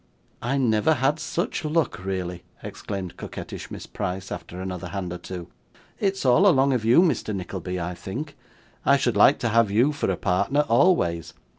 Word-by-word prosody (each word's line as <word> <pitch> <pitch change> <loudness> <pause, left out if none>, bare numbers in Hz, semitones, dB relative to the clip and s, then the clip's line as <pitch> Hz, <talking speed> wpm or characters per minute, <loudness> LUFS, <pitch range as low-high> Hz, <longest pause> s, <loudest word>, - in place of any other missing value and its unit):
'I 130 +4 0
never 125 +4 +3
had 140 +3 +1
such 170 +1 -2
luck, 155 - 0
really,' 90 -2 -3 0.2
exclaimed 95 -3 -6
coquettish - - -7
Miss - - -7
Price, 95 +1 -4
after 90 - -7
another 95 -2 -5
hand 95 -3 -4
or 90 - -6
two. 90 -1 -7 0.5
'It's 195 -5 0
all 145 +11 +5
along 140 -6 +4
of 120 -4 0
you, 120 +10 +6
Mr. 135 - 0
Nickleby, 90 -1 -4
I 90 +1 -3
think. 130 - -6 0.5
I 140 +1 +5
should 140 - 0
like 140 - +6
to 115 - -1
have 115 -1 +3
you 120 +8 +3
for 145 - -2
a - - 0
partner 105 +10 +1
always. 120 - +2
115 Hz, 175 wpm, -25 LUFS, 90-145 Hz, 0.5 s, you